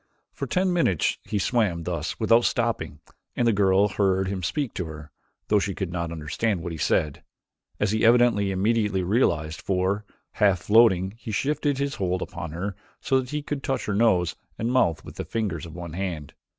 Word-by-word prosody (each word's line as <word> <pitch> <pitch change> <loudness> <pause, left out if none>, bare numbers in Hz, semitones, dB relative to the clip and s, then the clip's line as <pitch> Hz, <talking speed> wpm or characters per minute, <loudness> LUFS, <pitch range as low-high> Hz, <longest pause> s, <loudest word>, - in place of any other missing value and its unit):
For - - -4
ten 185 -1 +1
minutes 130 - +1
he 105 - -2
swam 100 -5 +1
thus 85 -2 -3
without 115 +1 +4
stopping 95 -11 -1 0.3
and 120 - +1
the 115 - +4
girl 100 0 +4
heard 95 -1 +1
him 95 -1 -3
speak 135 - -2
to 90 - -3
her, 75 -1 -9 0.4
though 105 - +4
she 100 -2 -2
could 95 -3 -3
not 85 -2 -3
understand 85 +5 -2
what 85 - -4
he 80 - -5
said, 75 -1 0 0.6
as - - +1
he 110 0 0
evidently 115 -4 +4
immediately 100 0 +1
realized, 85 - +1
for, 95 +2 0 0.3
half 100 -5 +2
floating, 100 -4 +4
he 115 - -8
shifted 145 +5 0
his 140 0 -1
hold 90 -1 -1
upon 85 - -6
her 90 +5 -4 0.2
so 135 - +2
that 125 -1 -5
he 150 +1 -3
could 145 -1 -4
touch 135 0 -2
her 105 - -1
nose 100 -5 +2 0.2
and 115 +2 -1
mouth 85 -11 +2
with - - -11
the - - -3
fingers 95 -8 -3
of 80 - -11
one 85 -2 -7
hand. 85 -6 -4
100 Hz, 190 wpm, -25 LUFS, 85-115 Hz, 0.6 s, without